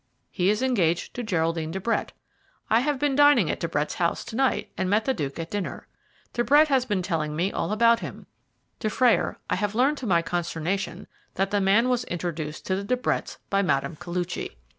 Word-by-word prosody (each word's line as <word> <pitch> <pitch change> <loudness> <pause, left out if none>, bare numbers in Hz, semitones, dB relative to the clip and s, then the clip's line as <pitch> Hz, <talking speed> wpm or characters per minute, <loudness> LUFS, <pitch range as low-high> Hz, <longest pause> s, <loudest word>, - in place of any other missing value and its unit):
"He 185 -1 +1
is 215 +4 +1
engaged 180 -10 +1
to 245 - -4
Geraldine 165 -6 -1
de 190 - -4
Brett. 230 +5 -1 0.6
I 225 - +6
have 285 +3 0
been 285 0 +1
dining 290 - +5
at - - -4
De 170 - -1
Brett's 150 -1 -1
house 170 -1 -1
to 225 - -7
night, 265 +1 +1
and 185 - -1
met 210 +2 +2
the 265 - +2
Duke 140 - -4
at 165 0 -5
dinner. 205 -2 -4 0.5
De 240 - +1
Brett 295 +6 +5
has 265 -3 +3
been 200 -5 0
telling 155 -4 -2
me 180 +5 0
all 165 - -2
about 230 +2 +4
him. - - -8 0.5
Dufrayer, 235 +2 +2
I - - 0
have 205 +2 -2
learned 275 +5 +2
to 250 - -5
my 170 -3 +3
consternation 175 +3 -2 0.3
that 195 +1 0
the 205 -1 +2
man 200 +5 +4
was 250 -1 +1
introduced 165 -3 -4
to 185 - 0
the 195 - -3
De 250 +5 0
Bretts 250 - -2
by 195 0 +3
Mme. 170 -4 0
Koluchy. 175 - -4
200 Hz, 205 wpm, -25 LUFS, 170-240 Hz, 0.6 s, I